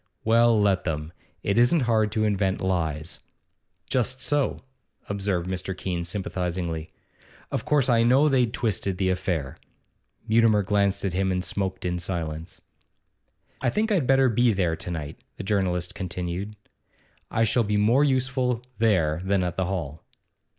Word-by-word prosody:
Well, 115 0 +4
let 100 -3 +2
them. 80 0 -3 0.3
It 100 +3 +1
isn't 125 +7 +4
hard 110 -4 +2
to 110 - +1
invent 100 -2 +1
lies.' 80 -4 -2 0.7
'Just 130 +1 -1
so,' 145 +1 0 0.5
observed 100 -3 -1
Mr. 95 0 -4
Keene 90 -3 -3
sympathisingly. 85 -3 -3 0.6
'Of 115 - -2
course 150 -4 +2
I 120 -3 +4
know 130 +6 +5
they'd 125 -5 +2
twisted 100 -5 -1
the 95 -1 +1
affair.' 90 -7 -2 0.7
Mutimer 110 -2 +4
glanced 100 0 +1
at 95 - -1
him 95 +1 +1
and 90 0 -1
smoked 95 -2 -3
in 90 0 -1
silence. 85 -2 -5 1.0
'I - - +2
think 215 - 0
I'd 170 -11 +2
better 135 0 +5
be 120 0 +3
there 90 -4 0
to 80 - -6
night,' 80 -4 -6
the - - -5
journalist 95 -3 0
continued. 90 +3 -4 0.7
'I 115 - +1
shall 115 +2 +2
be 105 -1 0
more 115 +7 +4
useful 130 -3 +1 0.2
there 90 -8 +2
than 95 -1 +1
at 90 -1 -2
the 95 - 0
hall. 80 -5 -4
100 Hz, 150 wpm, -25 LUFS, 90-115 Hz, 1.0 s, know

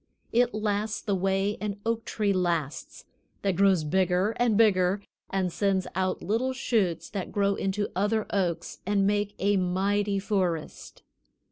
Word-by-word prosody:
It 240 -1 +2
lasts 215 0 -1
the 205 - -2
way 195 +2 0
an 205 -1 -3
oak 230 0 -1
tree 205 -2 0
lasts, 170 -6 -2 0.4
that 195 -2 +1
grows 190 -3 +4
bigger 185 +5 +2
and 235 -4 +2
bigger 200 -3 +3 0.3
and 185 -3 -1
sends 195 -2 +1
out 185 0 -1
little 235 +7 0
shoots 215 -10 0
that 195 -3 -4
grow 200 -1 +2
into 200 +1 -1
other 210 +3 +1
oaks 180 -4 -1
and 200 0 +1
make 205 0 0
a 200 +1 +2
mighty 200 +3 +1
forest. 185 -5 -2
200 Hz, 145 wpm, -27 LUFS, 185-210 Hz, 0.4 s, grows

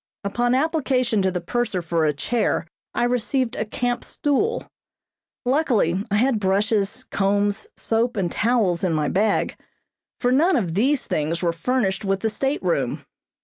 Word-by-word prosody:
Upon 240 +5 +1
application 260 -7 +1
to 190 - +2
the 180 -1 -3
purser 225 -4 -1
for 165 -1 +1
a 150 - +3
chair 220 +6 0 0.3
I - - +1
received 250 +1 0
a 215 - -2
camp 245 +3 -2
stool. 355 - 0 0.8
Luckily 245 - +2
I 205 - +1
had 235 +1 +2
brushes, 200 +1 0
combs, 205 +1 +1
soap 230 +1 0
and 180 -4 0
towels 215 -7 +1
in 180 -3 +1
my 150 -2 0
bag, 205 +2 +1 0.6
for 245 - +1
none 320 +8 +4
of 185 - 0
these 255 - +2
things 160 +3 -1
were 170 -1 +2
furnished 195 +1 0
with 195 -1 0
the 220 - 0
stateroom. 280 - -1
220 Hz, 150 wpm, -23 LUFS, 190-250 Hz, 0.8 s, none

